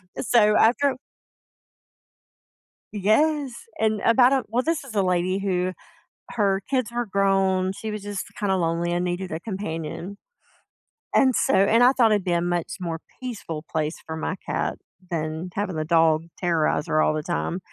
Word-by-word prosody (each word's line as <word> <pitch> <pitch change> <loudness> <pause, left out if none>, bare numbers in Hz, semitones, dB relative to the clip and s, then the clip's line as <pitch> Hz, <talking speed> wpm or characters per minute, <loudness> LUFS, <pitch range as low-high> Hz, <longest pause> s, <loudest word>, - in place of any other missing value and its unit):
And - - -4
so, 210 -2 +4
after 265 +5 +3 2.0
Yes. 270 +8 +2 0.3
And 220 -1 +1
about 245 +3 +5
a 265 -2 +1
Well, 240 +4 0
this 325 0 -1
is 255 -5 -10
a 200 - +3
lady 180 +1 +1
who 185 -2 -1 0.6
her 200 -3 +1
kids 255 -4 0
were 240 0 -2
grown, 195 -2 +1
she 220 +2 -6
was 210 -1 -5
just 205 -2 -4
kinda 195 -2 +1
lonely 170 -1 0
and 175 0 0
needed 180 +1 -3
a 160 - -3
companion. 180 -1 -5 1.0
And 260 -3 +4
so - - +2
and 215 +5 +4
I 250 - +7
thought 240 -4 +3
it'd 205 -3 +2
be 180 - 0
a 170 - +2
much 175 -1 -2
more 165 -3 -4 0.2
peaceful 200 -11 -5
place 155 0 -1
for 160 - -5
my 160 +3 -3
cat - - -2 0.3
than 160 +2 -3
having 200 -3 -2
the 155 0 -2
dog 160 -1 +3
terrorize 165 -2 0
her 155 -1 +2
all - - +2
the 155 -1 -3
time. 175 +1 -2
190 Hz, 170 wpm, -24 LUFS, 170-220 Hz, 2.0 s, I